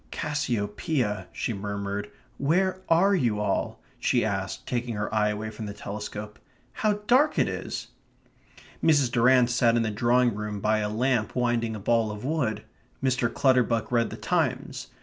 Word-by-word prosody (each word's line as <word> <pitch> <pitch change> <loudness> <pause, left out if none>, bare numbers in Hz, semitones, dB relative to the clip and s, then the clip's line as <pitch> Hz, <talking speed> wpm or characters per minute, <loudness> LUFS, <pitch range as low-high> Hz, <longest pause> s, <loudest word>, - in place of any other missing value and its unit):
"Cassiopeia," 120 -4 -2
she 120 - -3
murmured. 100 0 -4 0.3
"Where 185 +6 +1
are 180 +5 +5
you 120 - +1
all?" 105 -2 -1 0.2
she - - +2
asked, - - -3
taking 120 -2 -2
her 105 +1 -3
eye 105 -1 +2
away 105 +1 -4
from 110 0 -7
the 100 - -6
telescope. 105 +1 -6 0.3
"How 215 -1 +1
dark 265 +7 +4
it - - +3
is!" - - -5 0.9
Mrs. 145 -6 +4
Durrant 125 +1 +4
sat 120 -1 +3
in 115 - +2
the 110 - -1
drawing 120 +3 +3
room 105 0 -4
by 110 +2 +2
a 105 -1 -1
lamp 115 0 0
winding 120 -2 0
a - - -6
ball 115 +2 +2
of 105 +3 -6
wool. 135 -7 0 0.5
Mr. 125 -3 +1
Clutterbuck 125 -4 +2
read 115 -2 +2
the - - -7
Times. - - -1
115 Hz, 160 wpm, -26 LUFS, 105-130 Hz, 0.9 s, are